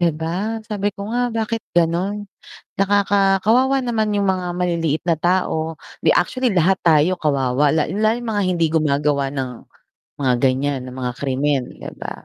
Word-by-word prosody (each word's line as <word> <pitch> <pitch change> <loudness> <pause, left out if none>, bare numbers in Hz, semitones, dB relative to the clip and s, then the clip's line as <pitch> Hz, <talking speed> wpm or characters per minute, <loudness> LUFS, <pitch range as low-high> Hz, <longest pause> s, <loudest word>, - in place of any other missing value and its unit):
'Di 170 -1 +3
ba? 190 +8 -2
sabi 205 -2 -1
ko 200 0 -8
nga 245 +1 0
bakit 225 0 -2
ganun 175 +5 0 0.5
nakaka 195 0 +3
kawawa 260 +4 +4
naman 230 -4 -1
yung 200 - +1
mga 185 -1 0
maliliit 165 -4 0
na 170 - +3
tao. 160 -1 -1 0.2
'Di - - +4
actually 255 -1 +1
lahat 190 0 +2
tayo 160 +2 +4
kawawa 140 -3 +1
la 155 +1 +1
lalo 215 +3 +1
yung 240 -1 -6
mga 205 -2 0
hindi 180 -3 +1
gumagawa 145 -2 +1
ng 135 -2 -3 0.7
mga 130 -3 +2
ganyan 135 +1 +1
ng 125 - -9
mga 125 -1 -3
krimen 140 0 0 0.2
'di - - -6
ba? - - -7
175 Hz, 165 wpm, -20 LUFS, 150-205 Hz, 0.7 s, kawawa